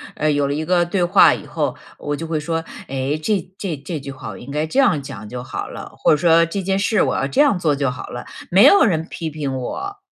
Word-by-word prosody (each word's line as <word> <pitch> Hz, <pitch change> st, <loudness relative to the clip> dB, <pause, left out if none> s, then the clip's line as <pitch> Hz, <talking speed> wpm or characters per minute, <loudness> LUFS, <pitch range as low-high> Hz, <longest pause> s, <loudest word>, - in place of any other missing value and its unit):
呃， 155 Hz, 0 st, +1 dB
有 145 Hz, -1 st, +1 dB
了 140 Hz, -, -1 dB
一 155 Hz, -, -2 dB
个 175 Hz, +1 st, +2 dB
对 175 Hz, +1 st, 0 dB
话 175 Hz, -, +6 dB
以 -, -, -6 dB
后， -, -, -2 dB, 0.2 s
我 145 Hz, 0 st, -3 dB
就 165 Hz, -, -5 dB
会 160 Hz, -1 st, -2 dB
说： 165 Hz, +2 st, -2 dB, 0.2 s
“哎， 135 Hz, +2 st, -2 dB
这 200 Hz, +3 st, +1 dB, 0.2 s
这 185 Hz, -6 st, -3 dB
这 150 Hz, +3 st, -6 dB
句 140 Hz, 0 st, -7 dB
话 135 Hz, -, -8 dB
我 -, -, -8 dB
应 125 Hz, -, -11 dB
该 150 Hz, +2 st, -1 dB
这 255 Hz, -, -1 dB
样 195 Hz, -, +3 dB
讲 110 Hz, -5 st, -8 dB
就 125 Hz, +3 st, -6 dB
好 -, -, -5 dB
了。” -, -, -9 dB
或 -, -, +3 dB
者 -, -, +6 dB
说： 165 Hz, +1 st, +4 dB
“这 195 Hz, +4 st, -3 dB
件 190 Hz, +1 st, 0 dB
事 205 Hz, 0 st, +2 dB
我 130 Hz, -3 st, +1 dB
要 135 Hz, -, 0 dB
这 140 Hz, -, +2 dB
样 275 Hz, -11 st, +3 dB
做 155 Hz, -4 st, +1 dB
就 140 Hz, -2 st, 0 dB
好 125 Hz, -, -8 dB
了。” 120 Hz, -, -7 dB, 0.2 s
没 190 Hz, +4 st, +6 dB
有 400 Hz, -, +7 dB
人 165 Hz, -7 st, 0 dB
批 165 Hz, -2 st, -4 dB
评 145 Hz, -3 st, -4 dB
我。 390 Hz, -, -5 dB
155 Hz, 285 characters per minute, -20 LUFS, 140-180 Hz, 0.2 s, 有